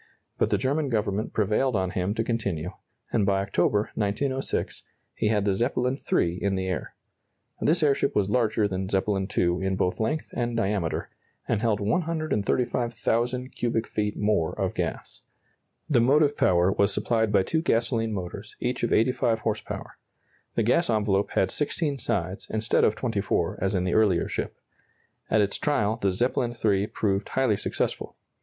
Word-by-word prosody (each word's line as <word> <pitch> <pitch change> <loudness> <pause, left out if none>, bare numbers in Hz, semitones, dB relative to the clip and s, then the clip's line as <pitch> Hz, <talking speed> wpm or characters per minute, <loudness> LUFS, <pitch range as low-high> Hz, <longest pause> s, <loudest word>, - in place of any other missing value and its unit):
But - - +2
the - - +2
German 140 +2 0
Government 105 -2 -1
prevailed 110 +4 +1
on 95 -2 0
him 95 +3 -1
to 115 - 0
continue, 100 -8 -2 0.4
and 110 - +3
by 100 0 +2
October, 100 +2 +1
1906, 130 +6 -2 0.3
he - - -1
had 105 -2 +1
the 100 - +2
Zeppelin 125 +5 0
III 85 +1 +2
in 100 -1 +1
the 95 0 -2
air. 90 -6 -4 0.7
This 165 +1 +3
airship 140 -2 +2
was 100 -2 +2
larger 110 -1 +2
than 95 -1 -3
Zeppelin 95 0 0
II 90 +1 +2
in 95 0 0
both 90 -1 0
length 150 +8 -1
and 120 -2 -1
diameter, 100 -6 -1 0.4
and 110 -3 0
held 110 -3 +1
135,000 125 - 0
cubic 115 -3 -1
feet 105 -1 -2
more 105 -6 0
of - - 0
gas. - - -4 0.7
The 130 -6 +3
motive 145 +4 +4
power 90 -4 +3
was 100 +1 +2
supplied 110 +1 +1
by 100 -2 +4
two 160 +10 0
gasoline 115 -5 +1
motors, 100 +1 -6
each 125 0 -2
of 120 - 0
85 115 -1 +2
horse 110 -1 -1
power. - - -8 0.6
The 115 - +2
gas 145 +10 +2
envelope 105 -3 +1
had 95 - +2
16 145 -1 -1
sides, 95 -3 -2
instead 110 +1 +1
of 105 - +3
24, 110 -6 -1
as 95 +1 0
in 90 - +1
the 90 - 0
earlier 105 -6 +3
ship. - - -4 0.7
At 110 - +4
its 100 0 -1
trial 110 -7 +1
the 100 -3 +1
Zeppelin 120 +4 0
III 100 -1 +3
proved 100 -2 -1
highly 130 -5 +2
successful. - - -3
110 Hz, 165 wpm, -26 LUFS, 100-120 Hz, 0.7 s, motive